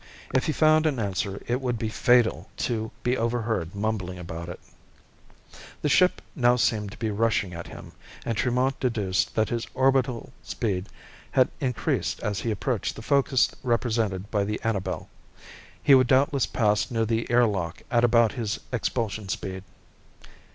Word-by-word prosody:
If 130 Hz, -, +2 dB
he -, -, +2 dB
found 155 Hz, +1 st, +4 dB
an 145 Hz, -4 st, 0 dB
answer, 100 Hz, -2 st, -2 dB
it 125 Hz, +2 st, -1 dB
would 125 Hz, -2 st, -1 dB
be 110 Hz, -, -2 dB
fatal 110 Hz, -6 st, +2 dB, 0.2 s
to 110 Hz, -2 st, -2 dB
be 125 Hz, +1 st, +2 dB
overheard 115 Hz, -7 st, -1 dB
mumbling 100 Hz, -3 st, -2 dB
about 85 Hz, -1 st, -7 dB
it. 85 Hz, -, -7 dB, 1.2 s
The 150 Hz, -, +2 dB
ship 180 Hz, +6 st, +3 dB
now 125 Hz, -4 st, +4 dB
seemed 110 Hz, -4 st, +1 dB
to -, -, -13 dB
be 110 Hz, -2 st, -2 dB
rushing 105 Hz, -3 st, +1 dB
at 85 Hz, 0 st, -7 dB
him, -, -, -10 dB, 0.3 s
and 115 Hz, -, -1 dB
Tremont 125 Hz, +3 st, +1 dB
deduced 105 Hz, -7 st, 0 dB
that 110 Hz, -1 st, +2 dB
his 115 Hz, -1 st, -2 dB
orbital 130 Hz, -2 st, +1 dB
speed 100 Hz, -3 st, -3 dB, 0.4 s
had 130 Hz, -1 st, +4 dB
increased 125 Hz, -6 st, -1 dB
as 105 Hz, -2 st, -2 dB
he 115 Hz, -, -2 dB
approached 115 Hz, +1 st, -1 dB
the 110 Hz, -, -9 dB
focus 140 Hz, -1 st, +3 dB
represented 115 Hz, -5 st, -1 dB
by 105 Hz, -2 st, +1 dB
the 105 Hz, +1 st, -2 dB
Annabel. 110 Hz, -4 st, -2 dB, 0.8 s
He 140 Hz, -, +6 dB
would 130 Hz, -2 st, +6 dB
doubtless 135 Hz, -2 st, +3 dB
pass 105 Hz, -2 st, +1 dB
near 115 Hz, -3 st, 0 dB
the 115 Hz, +1 st, -1 dB
air 120 Hz, 0 st, +5 dB
lock 95 Hz, -7 st, -3 dB
at 120 Hz, -1 st, +3 dB
about 115 Hz, -1 st, +5 dB
his 115 Hz, -6 st, -3 dB
expulsion 110 Hz, -4 st, -2 dB
speed. 95 Hz, -1 st, -4 dB
115 Hz, 160 wpm, -26 LUFS, 100-125 Hz, 1.2 s, He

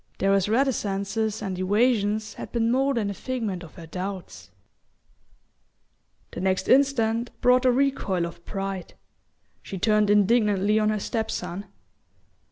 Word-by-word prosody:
Darrow's 195 Hz, 0 st, +2 dB
reticences 220 Hz, -3 st, 0 dB
and 190 Hz, -3 st, -4 dB
evasions 210 Hz, +1 st, +1 dB
had -, -, -8 dB
been 230 Hz, -1 st, +1 dB
more 270 Hz, +2 st, +2 dB
than 210 Hz, -3 st, -1 dB
a -, -, -4 dB
figment 220 Hz, -6 st, -4 dB
of 170 Hz, -, -12 dB
her 170 Hz, -, -10 dB
doubts. 185 Hz, +3 st, -6 dB, 1.8 s
The -, -, -6 dB
next 190 Hz, 0 st, 0 dB
instant 240 Hz, -4 st, +3 dB
brought 250 Hz, +1 st, +4 dB
a 255 Hz, -, +6 dB
recoil 245 Hz, -9 st, 0 dB
of 170 Hz, 0 st, -9 dB
pride. 195 Hz, -2 st, -5 dB, 0.7 s
She 195 Hz, -, -7 dB
turned 210 Hz, +2 st, +2 dB
indignantly 210 Hz, 0 st, +3 dB
on 215 Hz, 0 st, +2 dB
her 215 Hz, -1 st, 0 dB
step 220 Hz, +2 st, -2 dB
son. 190 Hz, +3 st, -5 dB
210 Hz, 135 wpm, -25 LUFS, 195-235 Hz, 1.8 s, a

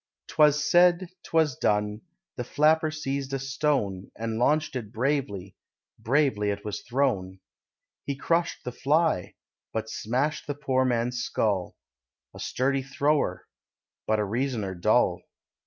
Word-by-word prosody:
'Twas 150 Hz, -1 st, +4 dB
said, 175 Hz, +1 st, +4 dB
'twas 160 Hz, -5 st, +1 dB
done; 105 Hz, +1 st, 0 dB, 0.3 s
the 120 Hz, -, -3 dB
flapper 155 Hz, +5 st, +3 dB
seized 140 Hz, -3 st, -3 dB
a -, -, +1 dB
stone, 130 Hz, -8 st, -1 dB
And 115 Hz, 0 st, -3 dB
launched 155 Hz, +4 st, +2 dB
it 110 Hz, -5 st, -5 dB
bravely 115 Hz, -7 st, -2 dB, 0.4 s
bravely 130 Hz, -5 st, +2 dB
it 100 Hz, 0 st, -3 dB
was 105 Hz, -1 st, -4 dB
thrown. 115 Hz, -8 st, -1 dB, 0.7 s
He 140 Hz, -, -1 dB
crushed 165 Hz, +4 st, 0 dB
the 125 Hz, -, -4 dB
fly, 145 Hz, -, +1 dB, 0.4 s
but 110 Hz, 0 st, -3 dB
smashed 130 Hz, +7 st, -1 dB
the 145 Hz, -, -2 dB
poor 130 Hz, -2 st, +1 dB
man's 120 Hz, 0 st, 0 dB
skull 100 Hz, -7 st, -1 dB, 0.6 s
A -, -, -11 dB
sturdy 135 Hz, +1 st, 0 dB
thrower, 140 Hz, -6 st, 0 dB, 0.6 s
but 110 Hz, -, +2 dB
a 105 Hz, -, 0 dB
reasoner 110 Hz, -3 st, -2 dB
dull. 85 Hz, -1 st, +2 dB
130 Hz, 130 wpm, -27 LUFS, 110-150 Hz, 0.7 s, Twas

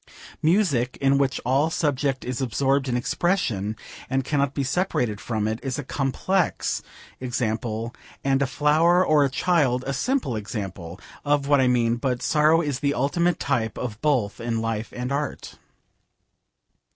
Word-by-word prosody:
Music, 155 Hz, -, +2 dB
in 135 Hz, 0 st, +3 dB
which 135 Hz, -2 st, +1 dB
all 135 Hz, +5 st, +2 dB
subject 140 Hz, -4 st, -1 dB
is 125 Hz, +1 st, -3 dB
absorbed 135 Hz, +2 st, +1 dB
in 120 Hz, -, +1 dB
expression 120 Hz, -, 0 dB, 0.3 s
and 135 Hz, 0 st, 0 dB
cannot 140 Hz, -2 st, 0 dB
be 140 Hz, -, 0 dB
separated 130 Hz, -, -1 dB
from 110 Hz, -2 st, -1 dB
it, 110 Hz, +1 st, -2 dB
is 130 Hz, -3 st, -3 dB
a -, -, -3 dB
complex 145 Hz, +8 st, 0 dB, 0.4 s
example, 115 Hz, -2 st, -2 dB, 0.3 s
and 135 Hz, 0 st, +2 dB
a 140 Hz, -, +2 dB
flower 160 Hz, +6 st, +3 dB
or 150 Hz, -3 st, +4 dB
a 140 Hz, -, +2 dB
child 135 Hz, -4 st, +1 dB
a 135 Hz, -, -2 dB
simple 250 Hz, -, 0 dB
example, 95 Hz, -5 st, -6 dB, 0.2 s
of 145 Hz, -1 st, +1 dB
what 145 Hz, -2 st, +4 dB
I 130 Hz, -, +3 dB
mean; 120 Hz, -1 st, +2 dB
but 125 Hz, 0 st, -2 dB
sorrow 155 Hz, +2 st, +4 dB
is 145 Hz, -4 st, -2 dB
the 140 Hz, 0 st, 0 dB
ultimate 170 Hz, +6 st, +1 dB
type 110 Hz, -3 st, -1 dB, 0.2 s
both 130 Hz, -9 st, +1 dB
in 115 Hz, -1 st, -2 dB
life 115 Hz, 0 st, -3 dB
and 125 Hz, +1 st, -4 dB
art. 145 Hz, +1 st, -4 dB
135 Hz, 150 wpm, -24 LUFS, 120-145 Hz, 0.4 s, or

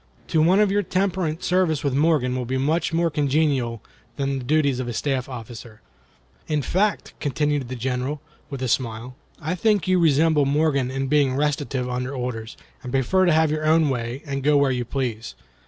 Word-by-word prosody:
To 160 Hz, -, +2 dB
one 180 Hz, +5 st, +4 dB
of 210 Hz, -2 st, +3 dB
your 205 Hz, +1 st, +2 dB
temperament 185 Hz, -4 st, -1 dB
service 180 Hz, -5 st, +1 dB
with 140 Hz, -3 st, 0 dB
Morgan 140 Hz, -3 st, +2 dB
will 125 Hz, -1 st, -2 dB
be 130 Hz, +2 st, -2 dB
much 155 Hz, +7 st, 0 dB
more 165 Hz, 0 st, +1 dB
congenial 140 Hz, -5 st, 0 dB, 0.3 s
than 135 Hz, -1 st, -1 dB
the -, -, -7 dB
duties 140 Hz, -1 st, +1 dB
of 130 Hz, -, -3 dB
a 120 Hz, -, -3 dB
staff 135 Hz, 0 st, -2 dB
officer. 115 Hz, -2 st, -9 dB, 0.7 s
In 150 Hz, -2 st, 0 dB
fact," 200 Hz, +7 st, 0 dB
continued 145 Hz, -2 st, -1 dB
the 130 Hz, -, -4 dB
General, 130 Hz, +4 st, -2 dB, 0.3 s
with 135 Hz, -2 st, -5 dB
a -, -, 0 dB
smile, 120 Hz, 0 st, -2 dB, 0.2 s
"I 160 Hz, +2 st, -2 dB
think 205 Hz, +1 st, +1 dB
you 185 Hz, -1 st, +3 dB
resemble 155 Hz, -2 st, +3 dB
Morgan 140 Hz, -2 st, +1 dB
in 135 Hz, +1 st, -2 dB
being 140 Hz, -2 st, +2 dB
restive 140 Hz, -3 st, -1 dB
under 125 Hz, +2 st, -3 dB
orders, 120 Hz, -3 st, -5 dB, 0.2 s
and 125 Hz, -, -7 dB
prefer 135 Hz, +9 st, +2 dB
to -, -, +4 dB
have 160 Hz, -1 st, +3 dB
your 155 Hz, 0 st, -2 dB
own 160 Hz, -1 st, +4 dB
way 120 Hz, +2 st, -4 dB
and 140 Hz, -2 st, -3 dB
go 145 Hz, +2 st, +3 dB
where 140 Hz, -1 st, +3 dB
you 125 Hz, -1 st, -2 dB
please. 120 Hz, -3 st, -4 dB
140 Hz, 190 wpm, -23 LUFS, 125-160 Hz, 0.7 s, one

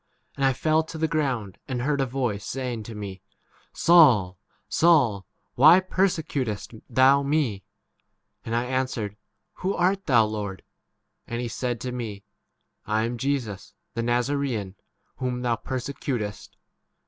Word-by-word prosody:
And 140 Hz, -, -3 dB
I 135 Hz, -, +5 dB
fell 155 Hz, +4 st, +2 dB
to 160 Hz, 0 st, -8 dB
the 160 Hz, 0 st, +1 dB
ground, 130 Hz, -, -2 dB
and 130 Hz, -3 st, -2 dB
heard 145 Hz, 0 st, +1 dB
a 135 Hz, -, 0 dB
voice 120 Hz, -5 st, -2 dB
saying 125 Hz, -3 st, -4 dB
to 115 Hz, -, -8 dB
me, 100 Hz, -3 st, -7 dB, 0.5 s
Saul, 120 Hz, -, +5 dB, 0.3 s
Saul, 130 Hz, -, +3 dB, 0.3 s
why 155 Hz, +7 st, +8 dB
8 185 Hz, 0 st, -3 dB
persecutest 145 Hz, -, -1 dB, 0.2 s
thou 130 Hz, +3 st, +5 dB
me? 140 Hz, -9 st, 0 dB, 0.8 s
And 115 Hz, -, -3 dB
I 120 Hz, +1 st, +1 dB
answered, 125 Hz, -5 st, -2 dB, 0.4 s
Who 190 Hz, +2 st, -1 dB
art 190 Hz, +2 st, +1 dB
thou, 120 Hz, -6 st, +5 dB
Lord? 105 Hz, -3 st, -5 dB, 0.6 s
And 120 Hz, -, -3 dB
he 120 Hz, -, -2 dB
said 120 Hz, 0 st, -3 dB
to 125 Hz, -, -3 dB
me, 110 Hz, -5 st, -5 dB, 0.6 s
I 110 Hz, +1 st, +1 dB
am 120 Hz, +1 st, -3 dB
Jesus 120 Hz, -, -3 dB, 0.2 s
the 115 Hz, -, -2 dB
Nazaraean, 120 Hz, -4 st, -1 dB, 0.4 s
whom 125 Hz, -1 st, -3 dB
thou 120 Hz, -1 st, +1 dB
perse 130 Hz, +1 st, -4 dB
s. 140 Hz, -, -6 dB
• -, -, -28 dB, 0.5 s
T. -, -, -37 dB
125 Hz, 150 wpm, -25 LUFS, 110-140 Hz, 0.8 s, why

